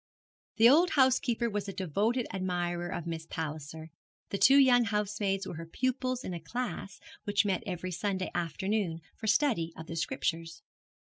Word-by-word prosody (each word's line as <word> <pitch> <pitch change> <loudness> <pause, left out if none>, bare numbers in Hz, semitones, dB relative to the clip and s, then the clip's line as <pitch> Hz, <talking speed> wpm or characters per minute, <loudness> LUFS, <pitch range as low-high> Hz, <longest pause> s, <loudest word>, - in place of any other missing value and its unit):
The 230 +1 +7
old 325 +8 +6
housekeeper 255 -3 +3
was 205 -2 -3
a - - -5
devoted 210 - 0
admirer 175 -2 -2
of 175 -1 -4
Miss 165 -1 -5
Palliser; 155 0 -6 0.4
the 200 - -3
two 270 +2 +7
young 250 -3 +6
housemaids 205 -2 -1
were 160 - -6
her 165 - -6
pupils 255 +5 -1
in 185 - -4
a 170 - -4
class 200 +1 -5 0.3
which 205 -1 +2
met 195 0 0
every 185 -1 -4
Sunday 190 +1 -2
afternoon 175 +1 -1
for 220 - -6
study 215 - +2
of 160 - -7
the 165 - -7
Scriptures. 165 -3 -2
195 Hz, 160 wpm, -30 LUFS, 170-235 Hz, 0.4 s, The